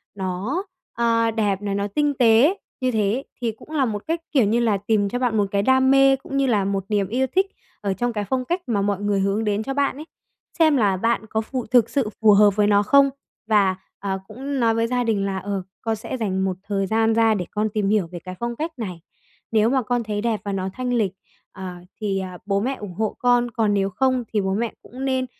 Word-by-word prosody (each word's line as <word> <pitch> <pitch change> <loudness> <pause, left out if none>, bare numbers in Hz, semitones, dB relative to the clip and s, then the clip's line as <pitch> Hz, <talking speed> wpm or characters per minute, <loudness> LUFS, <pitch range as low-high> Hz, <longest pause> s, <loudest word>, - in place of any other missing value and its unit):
nó, 195 - -2 0.3
a, 230 -1 +2
đẹp 205 -3 0
này, 200 -1 -2
nó 200 0 -1
tinh 290 +8 0
tế. 250 - +4 0.2
Như 255 0 +1
thế 210 -3 +1
ý 255 +5 -2 0.2
thì 235 -2 0
cũng 220 - -16
là 290 -4 +2
một 210 -3 -3
cách, 330 +1 -1
kiểu 265 -7 +4
như 220 +4 +2
là, 225 -4 +2
tìm 205 0 +1
cho 245 - -2
bạn 245 -3 +1
một 205 - +3
cái 200 - +2
đam 260 +4 +4
mê, 270 0 +6
cũng 270 +1 -6
như 275 - +3
là 210 -5 +2
một 195 -1 -1
niềm 205 -2 +1
yêu 255 +6 0
thích 385 +1 +3 0.3
ở 200 -2 0
trong 240 +4 -2
cái 210 -2 -2
phong 255 -1 0
cách 350 +6 -1
mà 215 -4 +1
mọi 200 -1 0
người 205 -1 +1
hướng 200 +3 0
đến 210 0 0
cho 270 - -3
bạn 280 -1 0
ấy, 305 - -8 0.5
xem 315 -3 +5
là 200 -5 +2
bạn 230 +2 0
có 220 - 0
phù 250 +2 -4
thực 235 0 +3
sự 270 -7 0
phù 220 -1 +7
hợp 205 -1 +5
với 210 -1 +3
nó 205 0 +4
không. 280 +5 +5 0.4
Và, 200 -4 +3 0.2
à, 195 -1 -2
cũng 270 +5 -4
nói 230 -2 +3
với 230 0 +1
gia 245 +1 0
đình 215 -4 0
là, 195 -1 -2
ờ, 195 +1 -3 0.2
con 225 -1 -1
sẽ 220 +4 -6
dành 190 -5 -1
một 185 -1 -2
thời 200 -2 -1
gian 225 +2 +2
ra 225 0 +4
để 185 -4 -2
con 215 +1 0
tìm 205 -2 0
hiểu 205 -4 +2
về 175 - -6
cái 185 +2 -8
phong 235 0 -3
cách 320 +6 -3
này, 185 -7 -5 0.5
nếu 220 0 +3
mà 265 +1 +2
con 245 0 -1
thấy 210 -1 -3
đẹp 225 -1 -1
và 200 - -2
nó 190 -1 -2
thanh 250 -1 -2
lịch, 215 -6 +1 0.4
ờ, 190 -1 -7 0.3
thì, 195 -2 0
ờ, 185 -1 -6
bố 200 -1 +1
mẹ 260 +5 -1
ủng 205 -6 -8
hộ 215 +4 -2
con, 245 -1 +2
còn 220 -2 +1
nếu 195 -1 +1
không 255 +5 +1
thì 210 - +2
bố 190 0 -1
mẹ 225 +2 -1
cũng 260 +2 -7
nên, 260 -1 0
220 Hz, 255 wpm, -22 LUFS, 200-250 Hz, 0.5 s, phù